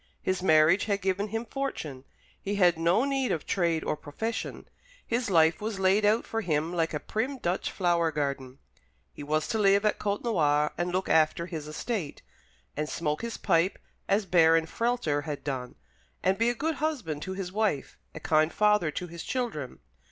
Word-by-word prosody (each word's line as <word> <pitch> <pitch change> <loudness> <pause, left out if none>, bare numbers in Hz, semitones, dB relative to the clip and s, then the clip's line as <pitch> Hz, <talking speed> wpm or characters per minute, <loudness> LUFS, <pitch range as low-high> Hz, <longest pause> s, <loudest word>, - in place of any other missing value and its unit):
His 185 -1 0
marriage 160 +1 +5
had 200 -2 0
given 195 +2 0
him 225 +3 -3
fortune. 160 - -5 0.4
He 200 +1 -2
had 180 -3 +4
no 170 +9 +2
need 270 -2 0
of 160 - -2
trade 170 -4 0
or - - -1
profession. 220 +10 -5 0.4
His 235 0 -1
life 160 -1 +4
was 215 -1 -3
laid 195 +2 +3
out 215 +3 +3
for 225 - -2
him 160 -2 -1
like 165 -2 0
a - - -1
prim 250 - -3
Dutch 180 -6 -1
flower 170 -3 +1
garden. 140 -3 -3 0.6
He - - -10
was 155 +1 -1
to 220 - 0
live 200 0 +4
at 210 - +1
Côtenoir, 165 -9 +1
and 175 +1 -2
look 185 +1 -1
after 160 +1 +3
his 160 -4 -6
estate, 160 0 -4 0.5
and 150 - -2
smoke 150 -2 -2
his 230 -1 -4
pipe, 180 0 +2 0.3
as 200 +1 +2
Baron 165 -2 +4
Frehlter 165 -8 -1
had 150 -3 -5
done, 130 -3 -4 0.5
and 190 +1 +3
be 230 +3 +2
a 240 - -1
good 315 +3 -2
husband 235 - -2
to 190 - -4
his 190 -2 -5
wife, 205 -8 -1 0.2
a - - -5
kind 155 +1 +2
father 210 -3 +3
to 165 +4 -4
his 170 -1 -8
children. 225 - -4
180 Hz, 180 wpm, -28 LUFS, 155-215 Hz, 0.6 s, marriage